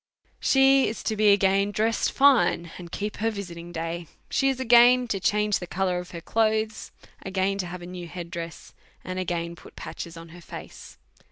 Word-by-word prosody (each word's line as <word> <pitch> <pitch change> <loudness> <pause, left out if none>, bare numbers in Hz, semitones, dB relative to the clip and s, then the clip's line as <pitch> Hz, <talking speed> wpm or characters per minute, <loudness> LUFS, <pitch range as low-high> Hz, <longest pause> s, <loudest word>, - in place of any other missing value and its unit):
She 270 0 +5
is 220 - -5
again 200 -2 +4
to 200 +1 +1
be - - -5
dressed 220 +2 +1
fine, 260 -11 +3
and 170 -1 -10
keep 210 +2 -4
her 225 +2 +1
visit 200 -5 -6
ing 170 +1 -9
da}'. 165 0 -4 0.2
She 270 - +2
is 265 -1 -2
again 245 0 +6
to 200 - -1
change 210 +1 +1
the 180 - -7
colour 180 -1 -1
of 180 0 -8
her 170 - -8
clothes, 220 +2 0 0.3
again 195 0 -1
to 180 - -2
have 175 0 -7
a - - -7
new 180 -1 -7
head, 170 0 -7 0.7
and 185 0 -4
again 170 -2 -3
put - - -15
patches 170 0 -7
on 165 0 -10
hei 175 +2 -12
face. 170 - -11
195 Hz, 190 wpm, -26 LUFS, 175-220 Hz, 0.7 s, again